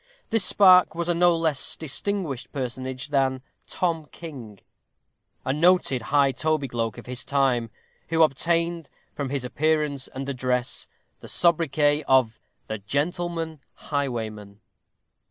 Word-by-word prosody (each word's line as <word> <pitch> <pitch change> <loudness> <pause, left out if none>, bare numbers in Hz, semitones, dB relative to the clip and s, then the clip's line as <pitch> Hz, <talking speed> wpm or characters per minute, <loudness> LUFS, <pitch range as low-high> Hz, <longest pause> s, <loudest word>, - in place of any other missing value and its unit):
This 225 -3 +3
spark 185 -3 +6
was 170 0 -2
a - - +3
no 175 0 +3
less 160 -4 +1
distinguished 155 -4 -3
personage 130 0 -5
than 135 -2 +1 0.2
Tom 165 -4 -2
King, 125 - -10 0.9
a 130 - 0
noted 165 -5 +3
high 140 +3 +2
tobygloak 130 -7 -1
of - - -10
his 125 0 -2
time, 130 -5 +1 0.4
who 165 0 +4
obtained, 165 +2 0 0.2
from 140 -2 -4
his 140 -1 -2
appearance 150 0 0
and 135 +1 -7
address, 125 -2 -1 0.3
the - - -12
sobriquet 150 -3 +2
of 130 -4 +3 0.3
the 110 -1 -5
"Gentleman 160 - -2 0.2
Highwayman." 110 -8 -4
140 Hz, 120 wpm, -25 LUFS, 130-165 Hz, 0.9 s, spark